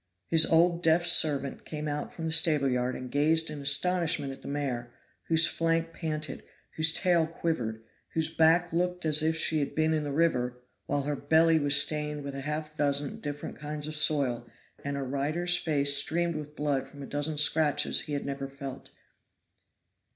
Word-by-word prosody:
His 160 Hz, -1 st, +4 dB
old 170 Hz, +1 st, +3 dB
deaf 165 Hz, +1 st, +3 dB
servant 145 Hz, -5 st, +2 dB
came 150 Hz, -1 st, -6 dB
out 150 Hz, 0 st, -4 dB
from 165 Hz, -, -7 dB
the 160 Hz, -, -2 dB
stable 155 Hz, -3 st, +4 dB
yard 125 Hz, 0 st, -1 dB
and 130 Hz, -1 st, -8 dB
gazed 160 Hz, +2 st, +2 dB
in 150 Hz, -1 st, -7 dB
astonishment 150 Hz, 0 st, +1 dB
at 135 Hz, -, -11 dB
the -, -, -11 dB
mare, 130 Hz, -4 st, -3 dB, 0.4 s
whose 165 Hz, 0 st, +5 dB
flank 165 Hz, 0 st, 0 dB
panted, 155 Hz, -4 st, -5 dB, 0.3 s
whose 160 Hz, 0 st, +3 dB
tail 170 Hz, -1 st, +2 dB
quivered, 125 Hz, -10 st, -3 dB, 0.3 s
whose 160 Hz, 0 st, -1 dB
back 165 Hz, +2 st, +3 dB
looked 180 Hz, 0 st, -1 dB
as 155 Hz, -1 st, +3 dB
if 160 Hz, +1 st, +1 dB
she 160 Hz, -1 st, +1 dB
had 140 Hz, -, -3 dB
been 155 Hz, 0 st, +1 dB
in 155 Hz, -1 st, -1 dB
the 145 Hz, -, -4 dB
river, 125 Hz, -6 st, 0 dB, 0.3 s
while 145 Hz, 0 st, -1 dB
her 145 Hz, +1 st, -2 dB
belly 160 Hz, +3 st, +3 dB
was 145 Hz, -1 st, +4 dB
stained 150 Hz, 0 st, -2 dB
with 140 Hz, 0 st, -6 dB
half 150 Hz, +3 st, -4 dB
a -, -, -28 dB
dozen 145 Hz, -1 st, -1 dB
different 145 Hz, 0 st, -6 dB
kinds 150 Hz, 0 st, -4 dB
of 155 Hz, -, -5 dB
soil, 135 Hz, -6 st, 0 dB, 0.3 s
and 140 Hz, 0 st, -3 dB
her 140 Hz, -, -3 dB
rider's 155 Hz, +7 st, 0 dB
face 145 Hz, -4 st, +3 dB
streamed 170 Hz, +4 st, +2 dB
with 150 Hz, -1 st, -7 dB
blood 140 Hz, -3 st, -1 dB
from 140 Hz, 0 st, -11 dB
a -, -, -6 dB
dozen 145 Hz, +2 st, -4 dB
scratches 150 Hz, 0 st, +2 dB
he 150 Hz, -, -6 dB
had 140 Hz, -, -3 dB
never 140 Hz, 0 st, -4 dB
felt. 140 Hz, -1 st, -9 dB
150 Hz, 185 wpm, -28 LUFS, 140-160 Hz, 0.4 s, whose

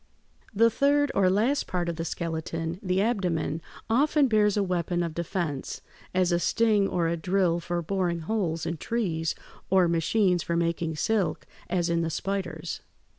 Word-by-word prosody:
] -, -, -36 dB
The 230 Hz, +3 st, +5 dB
third 285 Hz, +3 st, +2 dB
or 190 Hz, -2 st, +3 dB
last 230 Hz, +9 st, +1 dB
part 180 Hz, -2 st, -1 dB
of 170 Hz, -, -2 dB
the 165 Hz, +1 st, -4 dB
skeleton, 165 Hz, 0 st, -3 dB
the 185 Hz, -1 st, +1 dB
abdomen, 175 Hz, -8 st, -1 dB, 0.3 s
often 285 Hz, +5 st, +3 dB
bears 210 Hz, -3 st, +3 dB
a 205 Hz, -, +3 dB
weapon 175 Hz, -1 st, -1 dB
of 165 Hz, -2 st, -3 dB
defense, 170 Hz, -4 st, -3 dB, 0.3 s
as 185 Hz, -1 st, +2 dB
a 175 Hz, -, +2 dB
sting 215 Hz, 0 st, +2 dB
or 170 Hz, -3 st, 0 dB
a 170 Hz, -, 0 dB
drill 180 Hz, 0 st, +1 dB
for 175 Hz, 0 st, -3 dB
boring 175 Hz, -1 st, -1 dB
holes 170 Hz, -3 st, -1 dB
in 170 Hz, -, -2 dB
trees, 165 Hz, -5 st, -1 dB, 0.3 s
or 190 Hz, -2 st, +4 dB
machines 175 Hz, +2 st, +2 dB
for 170 Hz, -, -2 dB
making 170 Hz, -1 st, 0 dB
silk, 205 Hz, +4 st, 0 dB, 0.2 s
as 175 Hz, -2 st, +1 dB
in 170 Hz, -1 st, +1 dB
the 165 Hz, -, -1 dB
spiders. 195 Hz, +2 st, -3 dB
180 Hz, 170 wpm, -27 LUFS, 170-205 Hz, 0.3 s, The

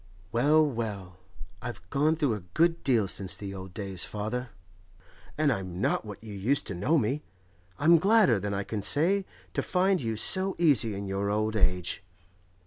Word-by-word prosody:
Well, 150 Hz, +6 st, +4 dB
well; 105 Hz, -9 st, -4 dB, 0.4 s
I've 120 Hz, -8 st, -7 dB
gone 150 Hz, +3 st, +2 dB
through 145 Hz, -7 st, +1 dB
a 105 Hz, -, -3 dB, 0.2 s
good 165 Hz, +1 st, +2 dB
deal 115 Hz, -7 st, +2 dB
since 95 Hz, -1 st, -1 dB
the 100 Hz, -1 st, -7 dB
old 95 Hz, -1 st, -8 dB
days, 95 Hz, -4 st, -2 dB
father, 115 Hz, +4 st, -4 dB, 0.9 s
and 150 Hz, -2 st, +3 dB
I'm 95 Hz, -4 st, -5 dB
not 100 Hz, -, 0 dB
what 105 Hz, 0 st, -9 dB
you 110 Hz, -2 st, -8 dB
used 115 Hz, +9 st, +1 dB
to -, -, -2 dB
know 105 Hz, -, +1 dB
me. 135 Hz, +3 st, 0 dB, 0.6 s
I'm 165 Hz, +3 st, +5 dB
gladder 195 Hz, -, +4 dB
than 100 Hz, +1 st, -3 dB
I 100 Hz, 0 st, -1 dB
can 105 Hz, +1 st, -4 dB
say 180 Hz, -, +2 dB, 0.3 s
to -, -, 0 dB
find 185 Hz, 0 st, +1 dB
you 115 Hz, -2 st, -2 dB
so 190 Hz, -, 0 dB
easy 130 Hz, -11 st, +3 dB
in 100 Hz, +1 st, -5 dB
your 100 Hz, +1 st, -2 dB
old 110 Hz, +1 st, 0 dB
age. 90 Hz, -4 st, 0 dB
110 Hz, 175 wpm, -28 LUFS, 100-150 Hz, 0.9 s, I'm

